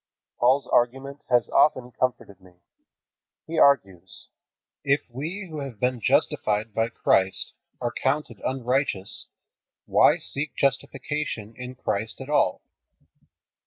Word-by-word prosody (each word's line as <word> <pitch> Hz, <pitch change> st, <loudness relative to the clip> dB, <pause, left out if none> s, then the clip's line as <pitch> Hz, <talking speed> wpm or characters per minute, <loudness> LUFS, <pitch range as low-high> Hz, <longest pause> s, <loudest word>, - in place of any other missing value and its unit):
Paul's 130 Hz, +3 st, +4 dB
argument 135 Hz, +4 st, 0 dB
has 120 Hz, -4 st, +3 dB
often 130 Hz, -4 st, +3 dB
comforted 110 Hz, -7 st, -2 dB
me. 90 Hz, -1 st, -18 dB, 0.9 s
He 165 Hz, 0 st, -2 dB
argues: 95 Hz, -10 st, +2 dB, 0.5 s
"If 140 Hz, +1 st, +3 dB
we 165 Hz, +11 st, -5 dB
who 155 Hz, -3 st, -6 dB
have 135 Hz, -7 st, -7 dB
been 125 Hz, -1 st, 0 dB
justified 105 Hz, +1 st, +1 dB
by 115 Hz, +2 st, +1 dB
Christ 95 Hz, -4 st, +1 dB, 0.3 s
are 120 Hz, -2 st, -2 dB
counted 145 Hz, +3 st, -1 dB
unrighteous, 130 Hz, -6 st, -1 dB, 0.6 s
why -, -, +5 dB
seek 145 Hz, +2 st, -5 dB
justification 135 Hz, -4 st, -2 dB
in 125 Hz, 0 st, -8 dB
Christ 110 Hz, -3 st, -3 dB
at 135 Hz, +2 st, -7 dB
all? 150 Hz, -, +2 dB
125 Hz, 115 wpm, -25 LUFS, 110-140 Hz, 0.9 s, why